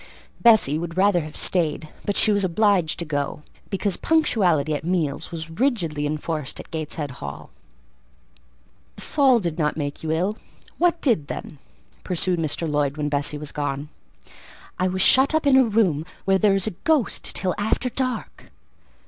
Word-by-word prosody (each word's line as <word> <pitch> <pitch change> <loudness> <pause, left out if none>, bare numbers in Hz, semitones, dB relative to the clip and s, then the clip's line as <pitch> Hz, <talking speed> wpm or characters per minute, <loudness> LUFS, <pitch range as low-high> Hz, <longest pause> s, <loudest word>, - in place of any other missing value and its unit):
Bessie 215 - +5
would 170 +1 -6
rather 190 -2 +3
have 155 -1 -9
stayed, 160 -3 +1 0.2
but 205 - -1
she 215 - +3
was 200 -1 +2
obliged 185 -2 +2
to 170 - -4
go, 145 -1 -3 0.3
because 195 -1 -1
punctuality 180 - +2
at 150 - -3
meals 165 -5 -1
was 165 -1 -6
rigidly 165 - -1
enforced 155 -1 -3
at - - -11
Gateshead 155 -2 -4
Hall. 70 0 -8 1.4
"The - - -11
fall 270 -5 +3
did 170 -5 -4
not 150 -1 0
make 145 -2 -4
you 160 - -4
ill; 185 +7 0 0.4
what 345 -1 +2
did, 215 - +1
then?" 145 - -7 0.4
pursued 180 -1 -1
Mr. 160 +1 -1
Lloyd 145 -1 0
when 150 -1 -1
Bessie 145 +1 -1
was 150 0 -6
gone. 145 0 -3 0.9
"I 185 - +2
was 185 0 0
shut 270 +4 +5
up 315 - +1
in 280 -2 +5
a 265 - +7
room 200 -9 +1 0.2
where 190 0 +3
there 200 -1 +4
is 195 - 0
a 215 - -1
ghost 310 -7 +2
till 185 -2 +1
after 220 +4 0
dark." 255 -1 -4
175 Hz, 165 wpm, -23 LUFS, 150-215 Hz, 1.4 s, a